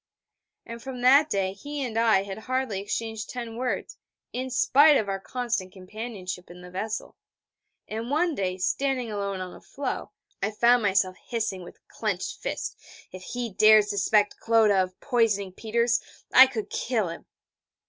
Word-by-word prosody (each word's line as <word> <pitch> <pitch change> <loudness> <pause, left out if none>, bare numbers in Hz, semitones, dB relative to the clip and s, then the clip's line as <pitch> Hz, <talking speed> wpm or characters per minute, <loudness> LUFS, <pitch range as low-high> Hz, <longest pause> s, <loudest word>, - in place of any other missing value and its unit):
And 230 0 -8
from 260 -1 -7
that 280 +5 +6
day 190 -1 0
he 285 +8 -5
and 230 -3 -6
I 225 -4 +4
had 195 +1 -7
hardly 255 -4 -2
exchanged 220 +2 -4
ten 235 -2 -6
words, 250 +2 -3 0.4
in 255 +1 -3
spite 285 +4 +5
of 210 - -1
our 195 0 -2
constant 230 -4 -3
companionship 190 -2 -7
in 175 +1 -12
the 180 0 -11
vessel; 215 +4 -4 0.7
and 225 +3 -5
one 320 +4 +1
day, 185 -7 -2
standing 255 +4 -1
alone 200 -2 -3
on 180 -1 -6
a - - -13
floe, 280 - -4 0.3
I 200 - +1
found 235 +3 +4
myself 190 -2 +1
hissing 220 -5 -2
with 175 - -14
clenched - - -3
fist: - - -4 0.3
'If 185 - -9
he 240 +3 -4
dared 215 +1 +6
suspect 205 +1 +2
Clodagh 220 -4 +4
of 185 0 -18
poisoning 220 -7 +1
Peters, 235 +4 +1 0.3
I 260 +1 +10
could 225 -5 -5
kill 220 -7 -1
him!' 165 - -9
220 Hz, 160 wpm, -26 LUFS, 195-245 Hz, 0.7 s, I